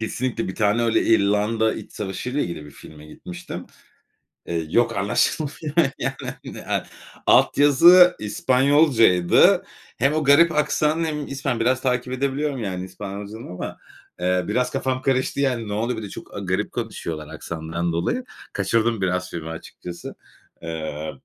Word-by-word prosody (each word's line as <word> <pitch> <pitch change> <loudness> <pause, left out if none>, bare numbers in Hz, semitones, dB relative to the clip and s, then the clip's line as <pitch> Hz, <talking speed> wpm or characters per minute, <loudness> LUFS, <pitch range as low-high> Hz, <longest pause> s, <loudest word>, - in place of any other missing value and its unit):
Kesinlikle 115 -1 -2
bir 95 - -5
tane 105 +2 +2
öyle 115 -1 +2
İrlanda 110 +1 +2
iç - - -9
savaşıyla 125 +8 -3
ile - - 0
ilgili 75 -3 -7
bir - - -12
filme 75 +1 -13
gitmiştim. 180 - -8 0.8
Eee, 85 -2 -2
yok, 115 +5 +2
anlaşılmıyor, 145 +9 -1 0.2
yani, - - -2 0.3
hani, - - -8
a - - -1 0.4
alt - - +5
yazı 170 +6 +7
İspanyolcaydı. 125 - +4 0.3
Hem 135 +5 +2
o 155 0 0
garip 145 +5 +6
aksanı 150 +1 +1
hem 150 -2 -3
İspan 135 -3 -2
biraz 130 +3 +1
takip 125 -1 -1
edebiliyorum, 140 0 -1
yani, 95 -2 -3
İspanyolcadan 100 +3 -8
ama, 90 - -6 0.4
eee, 90 0 +1
biraz 125 +4 0
kafam 130 -1 -1
karıştı, 135 +1 0
yani, 125 -5 0
ne 105 - -4
oluyor? 115 +2 -1
Bir 110 - -5
de 100 - -6
çok - - -10
a - - -4
garip 95 +1 -2
konuşuyorlar 85 -10 -5
aksandan 85 +1 -4
dolayı. 165 - -1 0.3
Kaçırdım 110 +2 +1
biraz 90 0 -1
filmi 80 -1 -6
açıkçası. 85 +1 -8 0.5
Eee, 80 -2 -5
115 Hz, 150 wpm, -23 LUFS, 90-135 Hz, 0.8 s, yazı